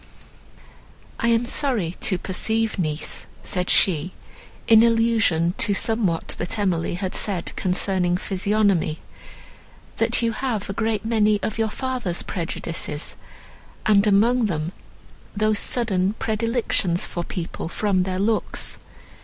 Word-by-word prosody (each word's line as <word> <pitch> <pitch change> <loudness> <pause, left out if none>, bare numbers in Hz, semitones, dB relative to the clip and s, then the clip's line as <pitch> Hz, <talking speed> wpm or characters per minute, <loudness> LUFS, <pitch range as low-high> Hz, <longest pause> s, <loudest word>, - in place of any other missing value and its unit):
"I 235 - +1
am 230 0 +3
sorry 240 - 0
to 205 -6 +1
perceive, 220 +4 -1
niece," 155 -3 -2 0.2
said 180 -2 -2
she, 180 -1 +2 0.5
in 225 -1 +7
allusion 225 -7 +3
to 200 - +3
somewhat 220 -7 0
that 175 +5 -2
Emily 180 -5 0
had 185 0 -3
said, 190 -5 -1
concerning 180 -1 +1
physiognomy, 195 -4 +1 1.0
"that - - +2
you 230 - +2
have 230 -4 -2
a 195 - -4
great 220 -1 -1
many 215 -2 +2
of 220 - -3
your 220 -1 +1
father's 250 -8 -2
prejudices, 165 -3 -4 0.7
and 205 -1 +4
among 225 +4 +4
them 160 -2 -2 0.6
those 215 0 +2
sudden 200 -5 +1
predilections 220 -5 0
for 175 - -4
people 170 -2 -5
from 195 0 +1
their 185 0 -2
looks. 210 +3 -1
200 Hz, 120 wpm, -23 LUFS, 180-225 Hz, 1.0 s, in